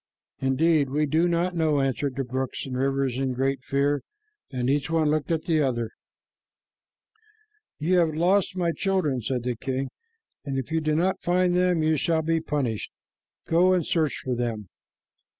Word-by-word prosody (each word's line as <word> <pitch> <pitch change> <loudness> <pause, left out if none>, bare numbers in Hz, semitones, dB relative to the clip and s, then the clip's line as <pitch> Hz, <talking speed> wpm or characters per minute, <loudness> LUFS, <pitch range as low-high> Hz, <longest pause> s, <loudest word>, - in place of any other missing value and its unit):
"Indeed, 140 +2 +2
we 150 +3 +1
do 160 +4 +2
not 175 +1 0
know," 155 -3 +2
answered 135 0 -1
the 135 - -1
brooks 130 +1 -3
and 130 -2 -5
rivers 135 -1 0
in 135 -1 0
great 135 0 -1
fear, 140 +1 +1 0.5
and 125 -2 -2
each 140 +1 +1
one 160 -2 +2
looked 155 -1 -1
at 165 -2 0
the 160 -3 +2
others. 120 -5 -1 1.9
"You 180 +4 +2
have 160 -3 +1
lost 185 +3 +2
my 175 -2 +1
children," 175 -9 0
said 125 +1 -2
the 125 0 -1
king, 130 +3 -3 0.5
"and 135 -2 -3
if 135 +3 -4
you 160 0 +1
do 155 0 +1
not 180 +4 +1
find 180 0 +2
them, 180 -3 +2
you 155 0 +2
shall 160 +2 +1
be 165 0 +1
punished. 135 -9 -2 0.5
Go 180 +3 +4
and 175 -4 +1
search 155 -4 0
for 130 - 0
them." 115 -5 -3
150 Hz, 170 wpm, -26 LUFS, 130-165 Hz, 1.9 s, Go